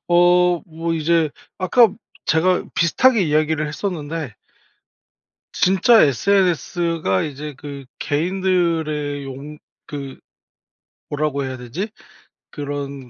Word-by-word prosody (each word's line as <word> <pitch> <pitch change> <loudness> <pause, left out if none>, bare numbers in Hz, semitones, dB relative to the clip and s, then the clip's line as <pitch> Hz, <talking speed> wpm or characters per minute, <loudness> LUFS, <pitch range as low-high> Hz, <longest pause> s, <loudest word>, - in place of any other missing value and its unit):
어. 175 0 +4
뭐 165 0 -3
이제 160 -1 +2 0.3
아까 225 +5 +5 0.4
제가 180 +3 +2
비슷하게 215 +6 +3
이야기를 155 0 +1
했었는데 155 - -4 1.2
진짜 195 +5 +4
SNS가 165 - +1
이제 150 0 -6
그 140 -2 -8
개인들의 160 -3 0
용 140 +3 -8 0.3
그 140 -2 -7 0.9
뭐라고 145 -2 -1
해야 130 0 -4
되지? 130 - -5 0.6
그런 140 -3 -5
155 Hz, 200 characters per minute, -21 LUFS, 145-180 Hz, 1.2 s, 아까